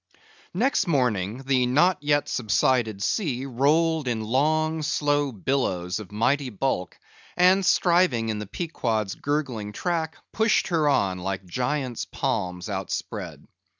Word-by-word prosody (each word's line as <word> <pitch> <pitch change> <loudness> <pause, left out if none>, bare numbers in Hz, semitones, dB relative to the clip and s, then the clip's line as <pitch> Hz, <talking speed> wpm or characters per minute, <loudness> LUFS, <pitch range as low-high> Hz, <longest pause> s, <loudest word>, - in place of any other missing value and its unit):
Next 260 -7 +1
morning 125 - 0
the 130 -2 +2
not 160 +9 +3
yet 145 0 +1
subsided 110 -2 +1
sea 135 - -1
rolled 150 +4 +1
in 115 -3 -1
long 155 +7 +1
slow 145 -1 +1
billows 95 -6 -1
of 105 -3 -10
mighty 130 +6 +1
bulk, 105 -5 -2 0.4
and 185 +2 +5
striving 170 -11 +3
in 110 -1 -2
the 105 - -6
Pequod's 110 - -2
gurgling 130 -8 -3
track, 165 - -2 0.2
pushed 220 -2 +2
her 160 -4 +2
on 95 -9 +1
like 95 +1 -4
giants' 125 +5 -2
palms 90 +1 -2
outspread. 95 -3 -5
130 Hz, 125 wpm, -25 LUFS, 105-155 Hz, 0.4 s, and